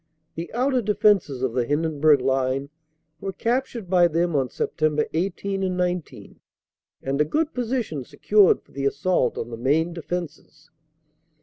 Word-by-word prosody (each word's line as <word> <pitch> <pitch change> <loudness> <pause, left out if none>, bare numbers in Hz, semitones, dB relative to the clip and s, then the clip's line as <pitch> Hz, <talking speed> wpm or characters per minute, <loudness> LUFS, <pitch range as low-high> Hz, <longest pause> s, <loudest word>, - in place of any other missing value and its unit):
The 165 +1 -6
outer 255 +1 +1
defenses 200 - +2
of 130 -3 0
the 125 -1 +1
Hindenburg 150 +1 +2
line 135 +1 0 0.5
were 195 - -4
captured 235 -1 -2
by 175 -1 +5
them 170 0 0
on 135 -2 +2
Sept. 150 +5 0
18 195 +3 -2
and 185 -1 -1
19, 180 -2 -3 0.6
and 135 +2 0
a - - +6
good 305 - -1
position 235 - -2
secured 205 - +3
for - - -26
the 140 0 -1
assault 140 -2 0
on 120 - -5
the 115 - -6
main 155 +8 +1
defenses. 160 -2 -7
165 Hz, 145 wpm, -24 LUFS, 140-195 Hz, 0.6 s, a